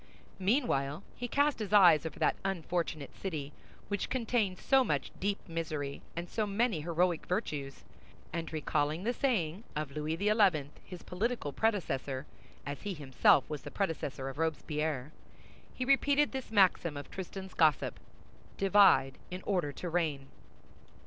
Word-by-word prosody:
Meanwhile, 190 - +1
he 245 - -4
cast 285 +3 +2
his 210 -3 -4
eyes 170 -6 +7
over - - -9
that - - +2
unfortunate 170 -5 -2
city, 150 -7 -5 0.3
which 205 -1 -2
contained 225 -6 0
so 270 +6 +4
much 145 - -1
deep 200 +1 0
misery 155 -4 -4
and 170 +1 -4
so 215 +3 -1
many 205 -4 +1
heroic 170 +1 0
virtues, 150 -8 -3 0.5
and 165 -1 -3
recalling 155 +1 -1
the 240 +3 0
saying 205 - 0
of 150 -2 -3
Louis 150 +2 -2
XI., 195 -8 +3
his 180 -2 -10
political 190 - -2
predecessor, 140 -10 -1 0.4
as 145 -1 -5
he 205 -2 -4
himself 135 -2 +3
was 150 -2 -5
the - - -8
predecessor 150 -8 -2
of 135 +2 -6
Robespierre, 150 -3 -1 0.6
he 255 - -4
repeated 280 +2 +3
this 265 -2 -5
maxim 185 -7 +3
of 145 - -8
Tristan's 190 0 -7
gossip: 155 -4 +2 0.6
"Divide 195 -9 +5
in 180 +1 -6
order 180 -8 0
to 180 - -6
reign." 155 -6 -1
170 Hz, 140 wpm, -32 LUFS, 150-205 Hz, 0.6 s, eyes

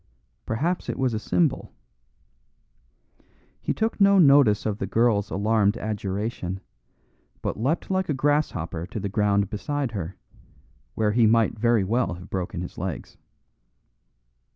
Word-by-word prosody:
Perhaps 165 +11 -1
it - - -3
was 130 -3 0
a 110 - -1
symbol. 155 +6 0 1.9
He - - -1
took 220 -1 -1
no 200 0 +6
notice 140 - +5
of 105 -1 -2
the 95 - -2
girl's 110 -1 +2
alarmed 105 +1 +1
adjuration, 100 -3 -3 0.8
but - - -2
leapt 145 - -1
like 190 -2 0
a 150 - +1
grasshopper 130 - -1
to 110 - -5
the 100 - -3
ground 100 -1 +1
beside 140 +4 -2
her, 95 -4 -5 0.8
where 105 -1 +1
he 115 0 +4
might 115 0 +2
very 115 -2 +3
well 110 -2 0
have 90 +1 -12
broken 90 -2 -3
his 90 - -7
legs. 90 -3 -5
110 Hz, 135 wpm, -25 LUFS, 100-135 Hz, 1.9 s, no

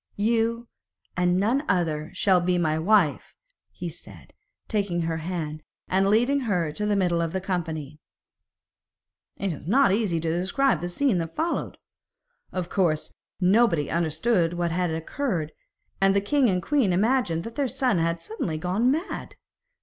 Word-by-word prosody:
'You 230 +2 0 0.5
and 180 0 +2
none 235 +9 +1
other 155 -3 0
shall 185 -3 +3
be 180 0 +1
my 160 -2 +1
wife,' 180 -3 +2 0.3
he - - -7
said, - - -12 0.3
taking 200 -5 -1
her 165 -1 -1
hand, 155 -2 -4 0.3
and 190 +1 +2
leading 245 +7 +3
her 185 - 0
into 210 +8 -3
the 210 - +2
middle 175 -3 +1
of 165 -1 -2
the 190 - 0
company. 160 -6 -4 1.4
It 195 -2 -2
is 150 - -10
not 260 +2 +4
easy 195 -5 +1
to 165 +1 -1
describe 195 - +1
the 175 - -3
scene 220 +1 +1
that 165 -1 -5
followed. 330 +2 -2 0.7
Of 185 -2 -3
course, 170 -5 0 0.3
nobody 185 -5 +3
understood 170 +2 +1
what 175 -1 -1
had 180 +1 0
occurred, 160 - -2 0.5
and 195 0 +4
the - - +5
king 255 +5 +2
and 180 -2 0
queen 265 - +2
imagined 200 -4 +1
that 230 - -7
their 275 +2 0
son 250 -7 +1
had 165 0 -1
suddenly 170 -5 -3
gone 185 +9 +1
mad. 320 +8 -3
180 Hz, 155 wpm, -25 LUFS, 165-225 Hz, 1.4 s, the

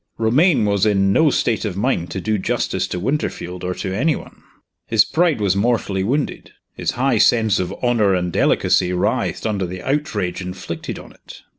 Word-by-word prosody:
Romayne 125 - +3
was 100 -2 +1
in 100 -2 +3
no 160 +4 +4
state 115 -5 0
of 100 -4 -3
mind 100 -6 0
to 95 - -4
do 105 +2 -1
justice 95 -4 -1
to 90 - -4
Winterfield 90 -7 -3
or 90 0 -2
to 95 -2 -4
any 145 +9 +1
one. - - -11 0.5
His - - +4
pride 165 -5 +1
was 100 -2 +1
mortally 100 -3 0
wounded; 140 +8 -2 0.2
his - - -2
high 130 -3 +2
sense 110 -3 +3
of 90 -1 -2
honor 110 -6 +3
and 90 -1 -2
delicacy 90 -1 +2
writhed 90 - -1
under 100 -4 -1
the 90 +1 -7
outrage 115 - -2
inflicted 90 -2 -6
on - - -12
it. - - -15
105 Hz, 180 wpm, -20 LUFS, 95-120 Hz, 0.5 s, no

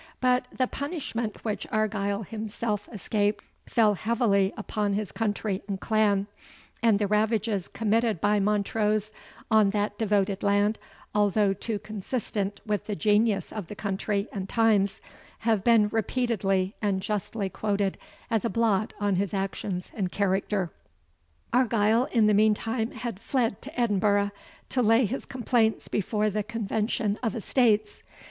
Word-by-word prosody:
But 250 0 +2
the 255 - +1
punishment 255 -7 -4
which 210 -2 -2
Argyle 210 -1 0
himself 210 0 -4
escaped 210 -1 -1 0.2
fell 220 -3 +4
heavily 205 -2 +2
upon 210 -1 -1
his 205 -4 -2
country 205 -1 -1
and 195 -2 -3
clan, 205 -2 +2 0.6
and 225 -3 +4
the 205 - +1
ravages 210 -1 +1
committed 225 -2 +1
by 205 +3 +2
Montrose 210 +1 +1 0.4
on 215 -2 +5
that 205 0 -1
devoted 200 -2 +1
land, 205 +1 +2 0.3
although 205 -1 +3
too 210 +3 -3
consistent 205 -1 -3
with 210 -2 -1
the 210 - -2
genius 210 +3 +2
of 210 -6 -5
the 210 - -8
country 200 +1 -2
and 195 -1 -5
times, 215 -4 +2 0.4
have 225 -4 +1
been 230 -3 +5
repeatedly 210 -4 0
and 200 -3 +1
justly 205 +1 -2
quoted 200 0 -1 0.3
as 225 -3 +1
a 235 - 0
blot 220 -3 +1
on 205 -2 +1
his 200 +1 -1
actions 190 -1 -3
and 190 -4 -2
character. 195 -2 0 0.8
Argyle 230 -1 +3
in 230 -6 +2
the 210 - +4
meantime 220 +2 +2
had 235 -6 -6
fled 230 -3 -1
to 280 -1 -6
Edinburgh, 205 -2 +2 0.4
to 255 - +1
lay 225 +2 +4
his 255 +7 -4
complaints 235 -3 +1
before 210 +1 0
the 210 +2 0
Convention 215 0 -1
of 225 -5 -1
Estates. 215 -2 +1
210 Hz, 140 wpm, -27 LUFS, 200-225 Hz, 0.8 s, on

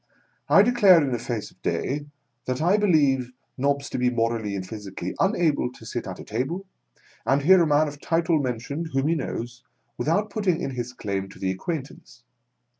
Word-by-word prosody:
I 200 - +7
declare 210 -7 +6
in 140 -4 0
the 120 - -1
face 115 -2 -4
of - - -28
day, 145 +2 -2 0.4
that! 130 0 -2
I 175 +5 +3
believe 140 -11 +2 0.2
Nobbs 140 +1 0
to - - -2
be 125 0 +3
morally 115 -3 -1
and 95 -1 -5
physically 95 -3 -6
xinable 170 - +2
to 110 - -13
sit 120 +2 -4
at 95 -1 -6
a - - -7
table 135 - -3 0.6
and 140 +1 +2
hear 185 +3 +7
a 165 - +3
man 150 +1 +3
of 145 0 -8
title 165 -1 +1
mentioned, 140 +5 -3
whom 135 +2 +1
he - - +3
knows, 125 -5 -4 0.4
without 205 +8 +1
putting 190 -6 0
in 140 - -3
his 125 -1 -4
claim 100 -4 -3
to - - -14
the 95 - -1
acquaintance. 135 - -6
135 Hz, 190 wpm, -25 LUFS, 120-165 Hz, 0.6 s, I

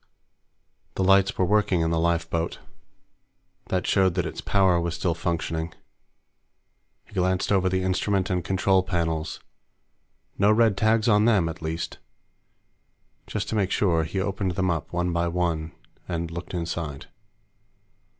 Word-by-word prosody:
The 95 - 0
lights 95 +1 +4
were 95 - +2
working 105 -2 +2
in 80 0 +1
the 80 - +1
lifeboat. 85 0 0 1.1
That 90 -1 -1
showed 95 -3 +2
that 90 -2 0
its 80 - -5
power 95 -3 +3
was 85 0 -2
still 85 - 0
functioning. 80 -1 -3 1.3
He - - -21
glanced 95 0 0
over 95 -2 +3
the 95 0 0
instrument 95 +1 0
and 90 -1 0
control 95 +2 +2
panels. 85 -3 -2 1.0
No 100 +1 +5
red 110 -1 +4
tags 110 +2 +2
on 105 -1 +4
them, 105 -8 +3
at 80 +1 -6
least. 80 +1 -4 1.3
Just - - -3
to - - -2
make 100 -3 +1
sure, 85 -5 +2
he 80 +5 -3
opened 95 -1 -1
them 95 -1 0
up, 80 -4 -3
one 90 0 -1
by 85 0 +1
one, 85 -2 -1 0.4
and 85 -2 -3
looked 85 +2 -6
inside. 80 -4 -4
90 Hz, 145 wpm, -25 LUFS, 85-95 Hz, 1.3 s, No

